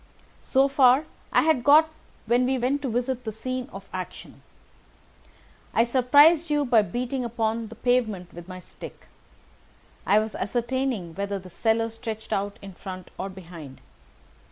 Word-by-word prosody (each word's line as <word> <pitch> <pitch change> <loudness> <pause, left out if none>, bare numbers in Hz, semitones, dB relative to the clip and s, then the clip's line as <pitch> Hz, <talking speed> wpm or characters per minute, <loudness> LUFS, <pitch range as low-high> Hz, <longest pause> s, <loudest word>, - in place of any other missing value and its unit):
"So 270 +1 +3
far 270 +1 +4 0.3
I - - +4
had 310 -6 +2
got 300 +3 +7 0.4
when 240 +2 +2
we 265 0 +1
went 260 +4 0
to 270 - -2
visit 245 +2 -2
the 220 - -4
scene 255 +4 -5
of 195 0 -10
action. 185 -2 -7 1.3
I 230 - +5
surprised 290 +7 +5
you 295 -1 +1
by 240 -4 +5
beating 245 +4 -3
upon 230 -1 -2
the 230 - -11
pavement 220 -7 0
with 175 0 -10
my 185 -1 -8
stick. - - -12 1.0
I 205 - +3
was 215 0 0
ascertaining 240 -4 -2
whether 200 +2 -3
the 185 -1 -11
cellar 225 +3 0
stretched 220 -1 -6
out 200 0 -2
in 195 -1 -9
front 185 0 -9
or 195 - -3
behind. 170 -7 -11
230 Hz, 155 wpm, -25 LUFS, 200-255 Hz, 1.3 s, got